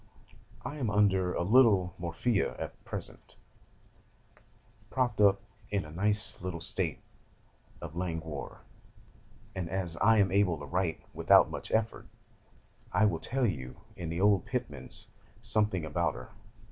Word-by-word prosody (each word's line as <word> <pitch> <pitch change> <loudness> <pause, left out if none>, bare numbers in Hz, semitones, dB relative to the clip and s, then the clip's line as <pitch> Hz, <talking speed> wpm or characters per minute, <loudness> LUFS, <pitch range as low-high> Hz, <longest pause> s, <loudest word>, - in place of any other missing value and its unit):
'I 150 - -5
am 125 -7 -1
under 95 -3 +2
a - - 0
little 100 -4 +4
morphia 90 +6 -1
at - - -7
present, - - -8 1.5
propped 120 -5 0
up 100 -1 +5 0.3
in 100 -4 -1
a 75 - -10
nice 105 +5 +2
little 90 -2 -4
state 80 - -1 0.8
of 80 -2 -8
languor, 80 -5 -5 0.9
and 90 -3 -4
as 90 -2 -2
I 110 +5 +4
am 100 -3 +3
able 95 -4 +2
to 75 - -8
write 80 +4 -1
without - - +5
much - - -6
effort, 110 0 -1 0.8
I 95 +4 +3
will 85 -6 +1
tell 130 +6 0
you 65 - -3 0.2
in 85 -2 -5
the 85 +1 -3
old 100 -3 +3
Pitman's - - -3 0.3
something 105 -6 +1
about 80 +1 -1
her. - - -10
95 Hz, 135 wpm, -30 LUFS, 85-105 Hz, 1.5 s, up